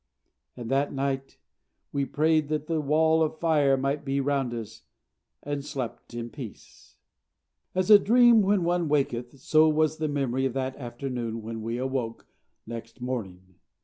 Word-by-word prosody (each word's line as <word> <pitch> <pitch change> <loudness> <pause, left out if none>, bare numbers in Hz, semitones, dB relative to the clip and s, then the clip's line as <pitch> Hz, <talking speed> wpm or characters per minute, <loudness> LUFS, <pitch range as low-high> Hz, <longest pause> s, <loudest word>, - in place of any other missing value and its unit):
And 120 0 -6
that 140 +2 +1
night 135 0 -3 0.5
we 140 -1 0
prayed 155 +2 +2
that 155 0 -2
the 160 -1 -1
Wall 160 +2 +3
of 160 0 0
Fire 150 -5 +3
might 140 +2 -1
be 140 0 -1
round 135 -2 0
us, 110 -2 -7 0.6
and 145 -1 -3
slept 135 -5 -6
in 120 0 -5
peace. 125 -8 -11 0.8
As 185 +2 +2
a 205 - +11
dream 235 +1 +6
when 195 -2 +2
one 175 -2 0
awaketh, 130 -3 -1
so 155 +4 +4
was 155 0 +1
the 155 - -1
memory 135 -2 0
of 130 - -5
that 130 0 -2
afternoon 120 -3 -5
when 115 0 -5
we 115 +2 -3
awoke 130 -3 -3 0.4
next 115 +1 -8
morning. 95 -8 -6
135 Hz, 155 wpm, -27 LUFS, 120-155 Hz, 0.8 s, a